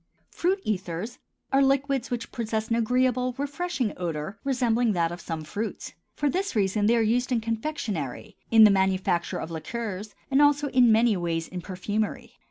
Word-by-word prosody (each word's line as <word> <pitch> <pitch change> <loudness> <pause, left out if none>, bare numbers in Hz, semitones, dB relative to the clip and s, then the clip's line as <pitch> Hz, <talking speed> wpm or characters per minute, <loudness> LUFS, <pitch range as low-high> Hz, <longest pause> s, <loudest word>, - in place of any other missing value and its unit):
FRUIT 380 +3 0
ETHERS 195 +3 -3 0.3
are 270 - +5
liquids 275 -1 +1
which 240 -2 -4
possess 220 -2 -2
an 230 - +2
agreeable, 250 +2 +1
refreshing 285 - -2
odor 170 +2 -4
resembling 245 -4 +1
that 170 -2 +1
of 175 +1 -7
some 165 -2 -5
fruits. 210 +8 -5 0.2
For 295 - 0
this 375 +2 -1
reason 205 0 +2
they 235 - +4
are - - +3
used 245 +4 +1
in 240 - +2
confectionery, 220 - -4
in 225 -1 +7
the 210 - +8
manufacture 190 -2 +1
of 160 - -5
liqueurs, 210 +3 -5 0.2
and 275 +2 +4
also 290 0 +4
in 250 -3 +5
many 225 0 +4
ways 165 -2 -2
in 180 -1 -6
perfumery. 205 +4 -3
225 Hz, 170 wpm, -26 LUFS, 190-255 Hz, 0.3 s, the